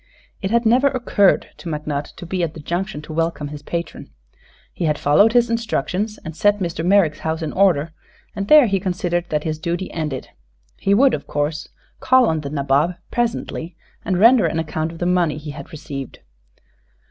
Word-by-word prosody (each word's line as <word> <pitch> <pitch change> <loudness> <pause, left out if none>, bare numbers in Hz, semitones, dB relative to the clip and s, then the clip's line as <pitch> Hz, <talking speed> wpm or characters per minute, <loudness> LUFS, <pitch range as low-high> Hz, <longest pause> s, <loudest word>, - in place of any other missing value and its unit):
It 190 - -2
had 235 +2 +2
never 250 +5 +4
occurred 240 -7 +2
to 175 - -7
McNutt 150 -2 -4
to - - -9
be 185 +1 -2
at 165 -2 -2
the - - -8
Junction 175 +2 -3
to 155 - -8
welcome 165 -2 -1
his 145 0 -8
patron. 170 +3 -5 0.6
He 175 - -3
had 150 -1 +1
followed 200 +12 +4
his 240 -1 +4
instructions 220 -2 -2
and 160 -1 -6
set 205 +3 +3
Mr. 170 -4 -3
Merrick's 175 -4 +3
house 160 +1 -3
in 155 - -4
order, 170 -5 +2 0.4
and 200 -1 -3
there 300 0 +8
he 195 -3 +1
considered 175 -2 -1
that 150 -1 -1
his 155 -1 -3
duty 175 +3 -3
ended. 150 -5 -4 0.5
He 200 - +2
would, 265 +3 +5
of - - -4
course, 145 +2 -2 0.3
call 255 -1 +4
on 160 -7 0
the 140 - -5
nabob, 140 +4 +1 0.2
presently, 225 -8 -2 0.3
and 185 - 0
render 230 +4 +6
an - - -2
account 160 0 -2
of 165 - -10
the 175 - -3
money 175 -4 +1
he 150 0 -7
had 145 - -10
received. 140 -3 -7
170 Hz, 190 wpm, -20 LUFS, 155-200 Hz, 0.6 s, there